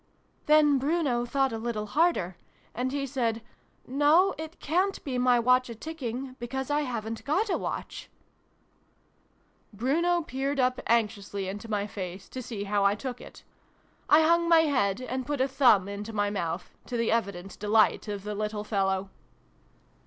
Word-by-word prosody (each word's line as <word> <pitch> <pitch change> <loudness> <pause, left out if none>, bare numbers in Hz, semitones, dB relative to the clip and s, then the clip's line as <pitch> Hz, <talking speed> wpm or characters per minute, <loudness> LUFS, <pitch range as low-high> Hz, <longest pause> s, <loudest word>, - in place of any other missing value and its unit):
"Then 300 -2 +5
Bruno 275 -4 0
thought 270 0 0
a 225 - -3
little 220 -2 -3
harder. 235 - +1 0.4
And 250 +3 -2
he 280 0 -2
said 240 -4 -1 0.5
'No! 300 +8 +4
It 315 +2 -8
cant 370 +6 0
be 255 -4 -2
my 250 -1 +4
Watch 250 +1 +3
a 235 - -6
tick 320 +7 -8
ing; 255 +2 -4
because 265 +3 -4
I 295 +1 +2
haven't 225 -5 -4
got 385 +9 0
a - - +2
Watch! - - -5 0.8
': - - -40
Bruno 330 - +1
peered 275 -1 -2
up 255 0 +1
anxiously 205 -4 0
into 205 +4 -6
my 205 -2 0
face, 190 -2 -7
to 255 - -6
see 220 -4 -5
how 205 0 0
I 200 +1 +4
took 250 +2 -6
it. - - -13 0.7
I 315 +1 +7
hung 335 +1 +3
my 330 -1 +7
head, 255 -9 +1
and 255 +1 -3
put 290 -2 -2
a 260 - +3
thumb 245 -8 +4
into 205 +2 -6
my 205 -1 0
mouth, 170 -3 -3 0.2
to 245 - -3
the 230 -1 +1
evident 200 -4 -2
delight 215 +2 +3
of 205 -2 -4
the 210 0 -4
little 210 0 -3
fellow. 195 -2 -1
245 Hz, 170 wpm, -28 LUFS, 210-285 Hz, 0.8 s, I